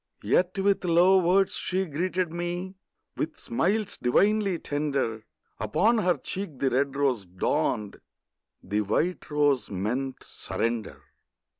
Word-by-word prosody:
Yet 185 +2 +2
with 195 0 +2
low 180 +2 +5
words 185 +2 +3
she 190 +1 -1
greeted 180 +2 -2
me, 175 +2 -3 0.4
With 160 - -3
smiles 195 - -1
divinely 200 - +2
tender; 140 -8 -2 0.3
Upon 210 - +2
her 180 -5 +2
cheek 175 0 -5
the 135 0 +1
red 135 +2 +1
rose 130 -9 0
dawned, 100 +3 -1 0.6
The 105 +1 0
white 155 - -1
rose 145 -3 +2
meant 120 +8 -3
surrender. 115 -2 -3
155 Hz, 120 wpm, -27 LUFS, 125-185 Hz, 0.6 s, low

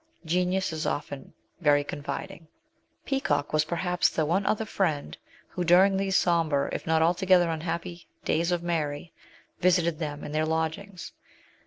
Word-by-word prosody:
Genius 180 +2 0
is 155 0 -3
often 140 -1 -4 0.3
very 145 -3 +3
confiding. 145 +3 -6 0.6
Peacock 150 - -1
was 155 0 +3
perhaps 180 +2 +1
the 155 - -1
one 185 +6 0
other 220 +1 +1
friend 165 -9 -1 0.3
who, 180 - -3
during 185 +3 +5
these 195 0 0
sombre, 160 -5 +2
if - - -5
not 160 0 +3
altogether 175 0 +3
unhappy, 170 +1 -5 0.2
days 170 +3 +1
of 175 -1 -1
Mary, 160 -2 -2 0.5
visited 170 -3 +2
them 145 -2 -4
in - - -6
their 155 +1 0
lodgings. 160 +4 -3
170 Hz, 145 wpm, -27 LUFS, 155-180 Hz, 0.6 s, during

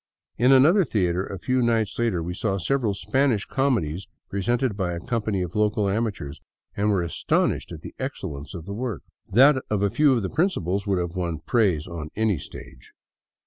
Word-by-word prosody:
In 125 +3 +5
another 155 +9 +6
theater 95 - 0
a 100 - -6
few 130 +7 0
nights 115 -3 +1
later 110 -8 0
we 90 +2 -4
saw 95 +1 -1
several 110 +3 0
Spanish 110 +2 +1
comedies 100 - -1 0.2
presented 120 +3 0
by 95 -4 -2
a 85 - -4
company 105 -1 -1
of 90 - -6
local 105 -1 +1
amateurs, 100 -9 -2 0.3
and 105 +1 +1
were 95 -4 +2
astonished 85 - 0
at - - -8
the - - -9
excellence 70 +5 -5
of 85 -2 -7
the 100 - -6
work. 115 -2 -4 0.3
That 130 +5 +5
of 105 -2 0
a 100 - +2
few 150 +4 +4
of 120 -4 0
the 95 - -2
principals 100 - 0
would 100 -2 +1
have 90 0 -3
won 85 -3 -2
praise 95 -10 +2
on 80 -3 -6
any 110 -6 +1
stage. - - -12
100 Hz, 185 wpm, -24 LUFS, 90-120 Hz, 0.3 s, another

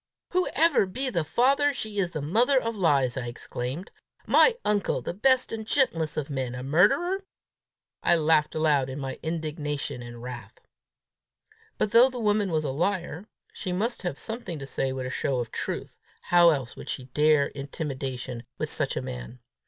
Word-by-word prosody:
"Whoever 335 - +3
be 255 +7 -3
the 170 -7 0
father, 275 - +2
she's 205 -6 -2
the 155 -4 -5
mother 240 - +3
of 230 -2 -3
lies!" 140 - +2
I 125 -2 -3
exclaimed. 125 - -5 0.3
"My 470 - +5
uncle 205 -1 +1
the - - -3
best 255 +7 +2
and 225 -1 -4
gentlest 170 - +1
of 150 -2 -1
men, 130 -4 -3
a 125 - -6
murderer!" 210 - +3 0.8
I - - +4
laughed 155 -1 +2
aloud 150 -4 +2
in 130 - -5
my 135 -1 -5
indignation 150 -5 -3
and 120 0 -9
wrath. 120 -3 -8 1.2
But, 210 - 0
though 240 +3 +7
the 255 - -7
woman 210 -3 +1
was 155 -1 +1
a 140 - -1
liar, 175 +4 -2 0.3
she 185 - -5
must 220 +7 -1
have 175 -6 -3
something 220 -7 -5
to 140 - -6
say 135 0 -2
with 130 -1 -4
a 130 - -4
show 135 -1 -1
of 120 -2 -4
truth! - - -5 0.2
How 175 -1 +6
else 135 -6 -1
would - - -9
she 130 - -3
dare 150 -1 +4
intimidation 135 -4 -5 0.2
with - - -2
such - - 0
a - - -2
man? 60 - -7
160 Hz, 175 wpm, -27 LUFS, 135-215 Hz, 1.2 s, though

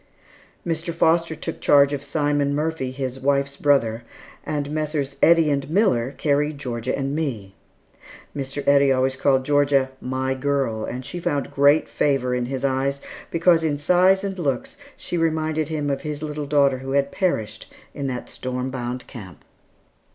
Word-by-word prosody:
Mr. 165 0 -2
Foster 165 0 +2
took 160 +1 -6
charge 140 0 +5
of 140 -1 -3
Simon 145 -1 0
Murphy, 155 -3 -2
his 130 0 -5
wife's 140 +1 0
brother, 120 -6 +2 0.4
and 145 -1 -3
Messrs. 150 -2 -2
Eddy 165 -2 +5
and 140 0 -1
Miller 145 - +2
carried 150 0 0
Georgia 125 -2 -3
and 135 +1 -2
me. 115 -12 -3 0.8
Mr. 140 0 -5
Eddy 140 -1 +5
always 130 0 +1
called 130 -1 +2
Georgia 140 -2 +2
"my 130 +1 -2
girl," 130 -5 -1
and 125 +1 -6
she 175 - -6
found 145 -4 -2
great 145 +2 +4
favor 135 -3 0
in 125 -1 -1
his 135 +1 -3
eyes, 135 +1 0 0.3
because 170 0 +3
in 150 -2 0
size 180 +5 +3
and 195 -2 -4
looks 135 -7 -2 0.2
she 175 - -3
reminded 160 -1 0
him 150 -2 -1
of 135 - -2
his 150 0 -5
little 150 -1 -4
daughter 140 -2 +3
who 135 +1 -5
had 140 0 +1
perished 110 - -2 0.2
in 140 -1 -4
that 125 -2 -4
storm 130 0 -4
bound 125 -1 -4
camp. 100 -8 -11
140 Hz, 160 wpm, -23 LUFS, 130-155 Hz, 0.8 s, charge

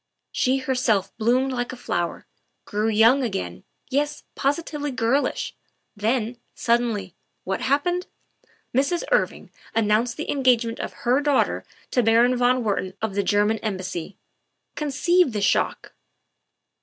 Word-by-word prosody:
She, 260 +1 +2
herself, 250 -7 0
bloomed 250 +4 +2
like 245 -1 -2
a - - -6
flower; 175 -8 -3 0.4
grew 210 +1 -1
young 225 +5 +5
again 90 - -3 0.3
yes, 290 +2 0
posi 285 +4 +1
tively 290 -3 -4
girlish. 255 +4 0 0.4
Then, 230 +2 -1 0.2
suddenly, 230 -6 0 0.3
what 190 0 -2
happened? 350 +7 +1 0.7
Mrs. 280 +6 +1
Irving - - 0 0.2
announced 225 +2 +2
the 310 - -3
engagement 245 -4 +2
of - - -7
her 250 +4 +3
daughter 290 -2 +1 0.3
to 250 - +3
Baron 235 +2 +4
von 250 0 +2
Wertman 195 -3 -1
of 220 -3 -2
the 200 - +1
German 205 +2 +2
Embassy. 185 -3 -4 0.6
Conceive 315 +1 +2
the 210 - -1
shock." 200 - 0
240 Hz, 130 wpm, -24 LUFS, 210-270 Hz, 0.7 s, young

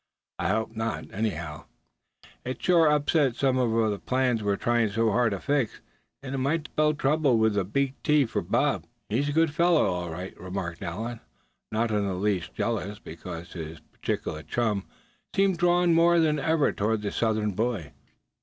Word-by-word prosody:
I - - 0
hope 110 +2 -1
not, 110 0 -3
anyhow. 85 -8 -3 0.8
It'd 130 +1 -4
sure 170 -3 +5
upset 150 -3 +2
some 130 0 +2
of 115 -3 +2
the 100 - -3
plans 125 +5 +1
we're 100 -1 +1
trying 120 0 +1
so 110 +2 +1
hard 120 +2 +3
to 100 -2 -3
fix. 140 -3 0 0.4
And 135 -1 -5
it 135 - -1
might 150 +4 0
spell 155 0 +2
trouble 145 -3 +2
with 110 -1 +2
a 100 - +2
big 135 +8 0
T 150 -2 +4
for 115 - -2
Bob." - - 0 0.2
"He's 135 +7 0
a - - 0
good 160 0 +2
fellow, 170 0 +4
all 90 -2 -2
right," 90 +4 -6
remarked 90 -2 -5
Allan, 110 +7 -4 0.5
not 110 +1 0
in 105 -1 +1
the 95 - -2
least 95 -2 -1
jealous 105 -3 -2
because 85 0 -8
his 80 -1 -7
particular 75 - -4
chum 105 0 -1 0.5
seemed 195 -3 +2
drawn 175 0 +4
more 170 +1 +5
than 155 -2 +2
ever 160 0 +2
toward 105 +1 -1
the 100 - -2
Southern 110 -2 0
boy. 105 -6 -2
115 Hz, 175 wpm, -27 LUFS, 100-145 Hz, 0.8 s, sure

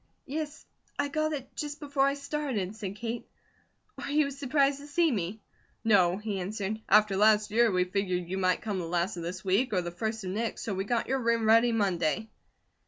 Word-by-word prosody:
"Yes, 300 +2 -5 0.3
I 285 - 0
got 310 +2 0
it 270 -4 -6
just 295 0 -4
before 280 -2 +1
I 275 - +1
started," 280 -9 -3
said 200 -3 -5
Kate. 235 +2 -5 0.7
"Are - - -5
you 290 -1 +2
surprised 275 0 +1
to 285 - -10
see 330 +1 +2
me?" 205 -1 -3 0.4
"No," 190 -5 +4
he 210 -2 -3
answered. 205 +3 -3
"After 210 -1 +5
last 210 +1 +4
year, 230 +1 +4
we 180 -1 +3
figured 180 -2 -1
you 190 +2 -3
might 185 -1 +1
come 205 -4 -2
the 175 - -3
last 175 +2 -1
of - - -4
this 180 +3 -5
week 210 +6 +2
or 185 - +2
the 175 - -4
first 220 +4 -3
of 185 - -3
next, 225 +3 -2
so 215 - -2
we 190 +1 -2
got 235 +2 0
your 270 0 0
room 230 -2 +1
ready 230 +2 +5
Monday." 200 -1 0
220 Hz, 205 wpm, -29 LUFS, 190-270 Hz, 0.7 s, After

